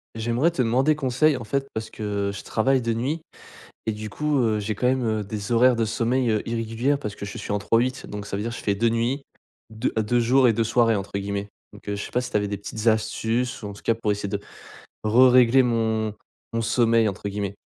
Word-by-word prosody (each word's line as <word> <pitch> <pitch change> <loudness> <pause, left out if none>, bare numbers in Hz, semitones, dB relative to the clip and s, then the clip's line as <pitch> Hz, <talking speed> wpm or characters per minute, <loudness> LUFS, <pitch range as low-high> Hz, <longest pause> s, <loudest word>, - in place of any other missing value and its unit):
J'aimerais 120 +8 +1
te 135 - -1
demander 130 +6 +3
conseil 140 +1 +2
en 120 - -7
fait 135 +5 -2
parce 110 0 -4
que, 100 -2 -2
heu, - - -2
je 100 - -8
travaille 130 +4 +1
de 115 -1 0
nuit 135 +8 -2 0.6
et 110 - 0
du 105 0 -6
coup, 150 +6 -1
heu, 110 -3 +2
j'ai 105 +1 -3
quand 125 - 0
même, 130 0 +1
heu, 110 -1 0
des 100 +1 -5
horaires 125 +2 +5
de 115 -1 +1
sommeil, 120 +3 0
heu, 110 -1 +1
irrégulières 115 +4 0
parce 105 -6 -5
que - - -6
je 100 - -7
suis - - -5
en 105 - 0
3-8 120 +5 0
donc 105 -1 -6
ça 100 - -4
veut 100 - -2
dire 115 - -3
je 115 - -6
fais 100 - 0
2 115 +3 +2
nuits-2, 115 -1 -4
de 110 - +2
deux 120 +3 +1
jours 125 +2 +4
et 115 - +4
2 115 - +1
soirées 115 0 +3
entre 100 -1 -4
guillemets. 100 0 -3 0.3
Donc, - - -15
heu, 100 - -1
je 100 - -4
sais - - -8
pas 125 - +1
si 125 - -6
tu - - +2
avais 105 0 0
des 100 0 -3
petites 105 +3 -5
astuces 110 +3 0
ou 105 - -5
en 100 - -7
tout 100 - -13
cas 115 - +2
pour 110 -2 -1
essayer 100 -1 -2
de 100 0 -2 0.7
rerégler 125 +2 +6
mon 110 -3 0 0.4
mon 115 - 0
sommeil 115 0 +3
entre 100 0 -4
guillemets. 100 0 -4
115 Hz, 245 wpm, -24 LUFS, 105-125 Hz, 0.7 s, rerégler